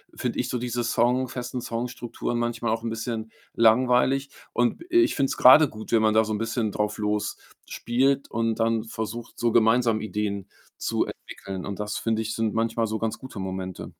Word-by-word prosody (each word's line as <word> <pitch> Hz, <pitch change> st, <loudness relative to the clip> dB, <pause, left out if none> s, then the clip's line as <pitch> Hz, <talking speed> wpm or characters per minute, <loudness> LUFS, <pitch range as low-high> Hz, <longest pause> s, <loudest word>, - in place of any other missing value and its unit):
finde -, -, -3 dB
ich -, -, -1 dB
so 125 Hz, -, -1 dB
diese 120 Hz, 0 st, -2 dB
Song 125 Hz, +2 st, +2 dB
festen 125 Hz, 0 st, -5 dB
Song-Strukturen 120 Hz, 0 st, -4 dB
manchmal 120 Hz, -1 st, -1 dB
auch 115 Hz, -, -1 dB
'n 115 Hz, -, -2 dB
bisschen 115 Hz, -1 st, -4 dB, 0.2 s
langweilig. 125 Hz, +4 st, +3 dB, 0.2 s
Und, 120 Hz, -, 0 dB
äh, 350 Hz, -, +4 dB
ich 340 Hz, -, +2 dB
finde 140 Hz, -, +2 dB
es -, -, -4 dB
grade 140 Hz, +3 st, +8 dB
gut, 110 Hz, 0 st, -9 dB
wenn 115 Hz, -1 st, +4 dB
man 110 Hz, 0 st, +3 dB
da 110 Hz, -, +6 dB
so 110 Hz, -, -2 dB
'n 105 Hz, -, -2 dB
bisschen 115 Hz, -1 st, -1 dB
drauf 105 Hz, +1 st, -1 dB
losspielt 120 Hz, +5 st, -1 dB
und 115 Hz, 0 st, 0 dB
dann 115 Hz, 0 st, +1 dB
versucht, 110 Hz, +1 st, -6 dB
so 120 Hz, -1 st, +2 dB
gemeinsam 115 Hz, 0 st, +3 dB
Ideen 100 Hz, -1 st, -3 dB, 0.3 s
zu -, -, 0 dB
entwickeln. 95 Hz, -1 st, -8 dB
Und 100 Hz, -1 st, -5 dB
das, 105 Hz, 0 st, -3 dB
finde 110 Hz, -1 st, 0 dB
ich, 110 Hz, +1 st, -3 dB
sind 110 Hz, -1 st, -1 dB
manchmal 115 Hz, 0 st, 0 dB
so 110 Hz, +1 st, -2 dB
ganz 110 Hz, 0 st, -3 dB
gute 130 Hz, -4 st, -10 dB
Momente. 95 Hz, -1 st, -5 dB
115 Hz, 195 wpm, -25 LUFS, 110-120 Hz, 0.3 s, grade